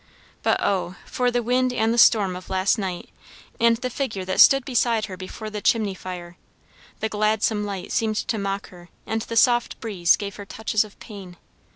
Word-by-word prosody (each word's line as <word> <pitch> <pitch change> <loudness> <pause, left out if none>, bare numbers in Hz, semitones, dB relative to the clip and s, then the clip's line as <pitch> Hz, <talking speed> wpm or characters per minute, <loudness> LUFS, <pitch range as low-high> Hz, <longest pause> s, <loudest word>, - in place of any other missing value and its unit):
But - - +1
oh 185 -2 -1
for 250 -1 0
the 245 0 -1
wind 250 +2 +1
and 225 -2 +1
the - - -2
storm 200 -6 +5
of 180 - -10
last 190 +4 +1
night, 185 -3 -5 0.5
and 230 0 +4
the 255 +2 -3
figure 220 -9 -3
that 185 0 -2
stood 270 -1 +7
beside 235 -3 +1
her 190 - -8
before 190 +4 -8
the 210 -1 -5
chimney 215 -3 +1
fire! 180 -2 -8 0.6
The 220 - +1
gladsome 215 0 0
light 195 -2 -6
seemed 220 -1 0
to 220 - -2
mock 195 0 -3
her, 175 -1 -15 0.2
and 220 +1 -2
the 230 0 -4
soft 240 +1 +3
breeze 190 -7 +2
gave 200 -1 -6
her 205 - -8
touches 220 0 0
of 210 -2 -15
pain. 195 -5 -11
210 Hz, 195 wpm, -23 LUFS, 190-230 Hz, 0.6 s, stood